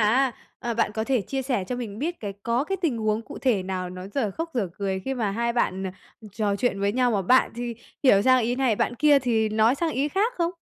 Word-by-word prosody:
á, 245 +5 +3 0.3
ờ, 235 -1 -2
bạn 230 -2 +1
có 220 +1 -2
thể 255 0 +1
chia 265 +7 -3
sẻ 250 -7 -1
cho 250 - -2
mình 220 -4 -6
biết 330 +6 -3
cái 205 -2 -4
có 235 +3 +1
cái 390 +4 -2
tình 280 -9 +1
huống 215 0 0
cụ - - -9
thể 230 -8 +1
nào 185 -1 -4
nó 185 +1 -7
dở 225 -7 0
khóc 330 - -5
dở 210 -7 0
cười 195 -1 -1
khi 270 - -2
mà 220 -6 -1
hai 235 +3 -1
bạn, 190 -5 0
à, 185 - -5 0.4
trò 205 -1 0
chuyện 200 -3 0
với 200 0 +1
nhau, 250 +1 +2
mà 205 -4 +1
bạn 255 +8 +4
thì 240 -1 -3 0.3
hiểu 200 -7 +6
sang 255 +1 +5
ý 235 +2 0
này, 255 -5 +2
bạn 245 - 0
kia 290 +2 +5
thì 230 -4 +1
nói 220 +4 +3
sang 325 +2 -1
ý 285 +2 0
khác 425 +9 0
không? 340 -1 +1
235 Hz, 265 wpm, -25 LUFS, 205-265 Hz, 0.4 s, hiểu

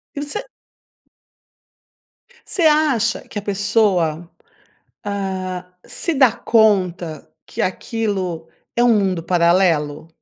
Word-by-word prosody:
E 285 - -3
você 420 +12 -4 2.0
Você 355 - -1
acha 300 -8 +2
que - - -8
a - - -8
pessoa, 190 -5 +1 0.8
hã, 190 -2 -3 0.2
se 335 - -2
dá 265 -5 +5
conta 185 -9 +1 0.2
que - - -5
aquilo 185 -5 -2 0.3
é 240 - +3
um 235 -3 +5
mundo 190 -4 0
paralelo? 170 -4 +2
195 Hz, 100 wpm, -20 LUFS, 175-230 Hz, 2.0 s, dá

